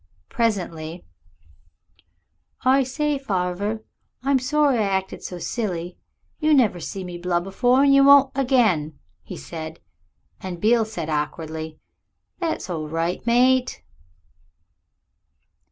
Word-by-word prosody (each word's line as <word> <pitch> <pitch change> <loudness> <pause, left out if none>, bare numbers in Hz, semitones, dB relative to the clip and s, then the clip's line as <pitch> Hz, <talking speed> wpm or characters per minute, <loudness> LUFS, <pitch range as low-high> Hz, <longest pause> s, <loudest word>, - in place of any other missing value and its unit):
Presently 175 -7 -2 1.6
"I 265 +2 +5
say, 285 +2 -1
farver, 200 -1 -2 0.4
I'm 275 0 +3
sorry 285 -1 +2
I - - +2
acted 190 -2 -1
so 180 - -6
silly. 180 -3 -4 0.4
You 310 -1 +3
never 220 -9 +3
see 190 +3 -6
me 175 -1 -7
blub 175 0 -1
afore 245 +7 +3
and 280 -1 +5
you 275 0 +6
won't 280 -1 +7
again," 225 - +1 0.2
he - - -9
said; 155 - -8 0.6
and 180 -2 -6
Beale 225 +3 +3
said 175 -8 -5
awkwardly, 155 +1 -4 0.6
"That's 335 -3 -2
all 160 -4 -4
right, 165 +3 -2
mate." 250 - +3
200 Hz, 115 wpm, -23 LUFS, 170-260 Hz, 1.6 s, won't